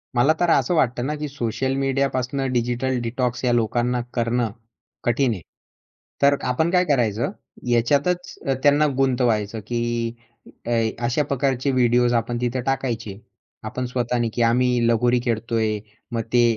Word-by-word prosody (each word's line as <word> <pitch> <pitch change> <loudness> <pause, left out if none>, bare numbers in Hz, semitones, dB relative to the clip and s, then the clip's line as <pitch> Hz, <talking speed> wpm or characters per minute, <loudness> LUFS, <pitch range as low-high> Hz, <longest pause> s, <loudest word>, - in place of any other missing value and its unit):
मला 130 +6 +4
तर 175 - +2
असं 140 0 +3
वाटतं 125 -5 +1
ना, 150 +2 -1
की 150 0 -4
सोशल 130 -1 -2
मीडियापासून 135 -1 0
डिजिटल 125 +2 0
डिटॉक्स 125 +1 -2
या 125 - +3
लोकांना 120 +1 +1
करणं 120 -1 0 0.5
कठीण 120 +2 +2
आहे. 95 - -7 0.8
तर 140 0 +5
आपण 125 +7 +1
काय 180 0 +3
करायचं 120 - +1 0.4
याच्यातच 145 +10 +1
अ, 135 - +3
त्यांना 145 +1 +5
गुंतवायचं, 120 -5 +1
की 120 -1 -1 0.5
अ, 120 - -3 0.3
अशा 120 +5 +1
प्रकारचे 135 -1 0
व्हिडिओज 120 -1 +3
आपण 120 +1 0
तिथं 125 +1 -1
टाकायचे 120 -7 -2 0.4
आपण 125 - -4
स्वतःनी, 120 -1 -1
की 120 - -1
आम्ही 120 0 +3
लगोरी 120 +1 +3
खेळतोय. 110 -2 0 0.3
मग 115 -1 -1
ते 120 - +5
125 Hz, 140 wpm, -23 LUFS, 115-135 Hz, 0.8 s, तर